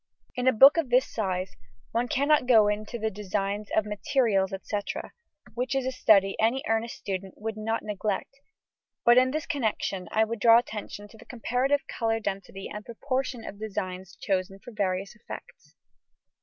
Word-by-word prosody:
In 250 Hz, 0 st, -1 dB
a -, -, +7 dB
book 270 Hz, +7 st, +8 dB
of 320 Hz, -6 st, 0 dB
this 250 Hz, +2 st, +4 dB
size, 185 Hz, -, -3 dB, 0.4 s
one 235 Hz, +2 st, 0 dB
cannot 285 Hz, +1 st, +2 dB
go 220 Hz, -4 st, +6 dB
into 210 Hz, +3 st, -2 dB
the 220 Hz, -1 st, -2 dB
designs 200 Hz, +1 st, -3 dB
of 215 Hz, -, +3 dB
materials, 210 Hz, -2 st, +1 dB
&c., 210 Hz, -, -2 dB, 0.8 s
which 250 Hz, +3 st, -2 dB
is 270 Hz, -1 st, 0 dB
a 260 Hz, -, 0 dB
study 200 Hz, -6 st, +4 dB
any 235 Hz, +5 st, +2 dB
earnest 225 Hz, +1 st, 0 dB
student 190 Hz, -1 st, -5 dB
would 220 Hz, +1 st, -4 dB
not 225 Hz, +1 st, -2 dB
neglect, 210 Hz, +5 st, -3 dB, 0.7 s
but 240 Hz, +1 st, +8 dB
in 255 Hz, 0 st, +3 dB
this 305 Hz, +3 st, -2 dB
connection 215 Hz, -7 st, -2 dB
I 220 Hz, -, +3 dB
would 225 Hz, 0 st, -3 dB
draw 230 Hz, +2 st, +7 dB
attention 210 Hz, -3 st, -4 dB
to 225 Hz, -, -16 dB
the -, -, -14 dB
comparative 255 Hz, +4 st, 0 dB
colour 225 Hz, -1 st, -1 dB
density 195 Hz, -2 st, -5 dB
and 210 Hz, 0 st, -7 dB
proportion 255 Hz, +1 st, -3 dB
of 200 Hz, -, -8 dB
designs 190 Hz, -3 st, -5 dB
chosen 195 Hz, 0 st, -2 dB
for 245 Hz, -, -12 dB
various 195 Hz, -2 st, -2 dB
effects. 215 Hz, -, -11 dB
220 Hz, 170 wpm, -27 LUFS, 200-245 Hz, 0.8 s, book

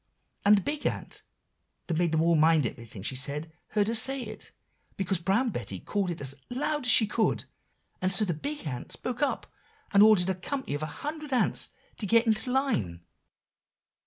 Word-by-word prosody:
And 205 Hz, +1 st, +6 dB
the -, -, 0 dB
big 290 Hz, +9 st, -2 dB
ant -, -, -4 dB, 0.6 s
that 165 Hz, -2 st, -1 dB
made 175 Hz, -2 st, +2 dB
them 160 Hz, 0 st, +2 dB
all 170 Hz, 0 st, +4 dB
mind 160 Hz, -2 st, +4 dB
everything 115 Hz, -4 st, -7 dB
she 130 Hz, -, -2 dB
said, 145 Hz, +5 st, -2 dB, 0.2 s
heard 210 Hz, -1 st, +1 dB
her 225 Hz, -, 0 dB
say 265 Hz, +3 st, +3 dB
it, 215 Hz, -1 st, -7 dB, 0.5 s
because 190 Hz, -2 st, 0 dB
Brown 205 Hz, +8 st, +1 dB
Betty 100 Hz, -, -5 dB
called 200 Hz, -, -2 dB
it 170 Hz, -, -4 dB
as 135 Hz, -1 st, -1 dB
out 140 Hz, -, -22 dB, 0.2 s
loud 295 Hz, 0 st, -1 dB
as -, -, +6 dB
she 220 Hz, -, +8 dB
could; 215 Hz, +1 st, 0 dB, 0.6 s
and 185 Hz, 0 st, +1 dB
so 215 Hz, +3 st, +4 dB
the 175 Hz, -, -1 dB
big 290 Hz, -, -5 dB
ant 125 Hz, -5 st, -5 dB
spoke 250 Hz, +1 st, -5 dB
up, 290 Hz, -, 0 dB, 0.5 s
and 200 Hz, -, +6 dB
ordered 205 Hz, -4 st, +6 dB
a -, -, 0 dB
company 225 Hz, -, -4 dB
of 145 Hz, -, -3 dB
a 155 Hz, -, -2 dB, 0.2 s
hundred 305 Hz, -1 st, -5 dB
ants 255 Hz, -, +1 dB, 0.3 s
to 210 Hz, -, -2 dB
get 230 Hz, +3 st, +4 dB
into 225 Hz, +2 st, 0 dB
line." 125 Hz, -, 0 dB
195 Hz, 195 wpm, -28 LUFS, 155-240 Hz, 0.6 s, she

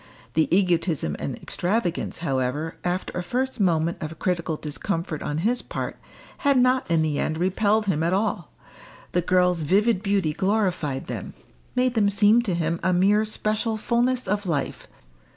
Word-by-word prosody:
The 160 Hz, 0 st, +3 dB
egotism 170 Hz, -, +1 dB
and -, -, -3 dB
extravagance, 180 Hz, -1 st, -2 dB
however, 135 Hz, +3 st, -1 dB
after 180 Hz, +1 st, -2 dB
a 180 Hz, -, -1 dB
first 255 Hz, +7 st, -2 dB
moment 170 Hz, -3 st, +1 dB
of 160 Hz, +1 st, -5 dB
critical 170 Hz, -4 st, -1 dB
discomfort 160 Hz, +1 st, -3 dB
on 145 Hz, -, -3 dB
his 245 Hz, +2 st, +2 dB
part, -, -, -5 dB, 0.4 s
had 280 Hz, -1 st, +3 dB
not 255 Hz, -2 st, +3 dB
in 165 Hz, -2 st, +3 dB
the 150 Hz, -2 st, 0 dB
end 155 Hz, -, -1 dB
repelled 205 Hz, +5 st, +2 dB
him 165 Hz, -6 st, 0 dB
at 165 Hz, +1 st, +1 dB
all. 200 Hz, +4 st, -1 dB, 0.6 s
The 180 Hz, -, +2 dB
girl's 180 Hz, -1 st, +2 dB
vivid 195 Hz, +6 st, +2 dB
beauty 195 Hz, -6 st, +1 dB
glorified 185 Hz, -8 st, 0 dB
them; -, -, -6 dB, 0.4 s
made 250 Hz, 0 st, +2 dB
them 210 Hz, -4 st, +3 dB
seem 205 Hz, +3 st, +4 dB
to 200 Hz, -7 st, -1 dB
him 170 Hz, 0 st, -1 dB
a 185 Hz, +1 st, +2 dB
mere 205 Hz, +4 st, +3 dB
special 215 Hz, +1 st, -1 dB
fulness 240 Hz, +1 st, 0 dB
of 205 Hz, 0 st, -1 dB
life. 150 Hz, -5 st, -2 dB
185 Hz, 160 wpm, -24 LUFS, 165-215 Hz, 0.6 s, seem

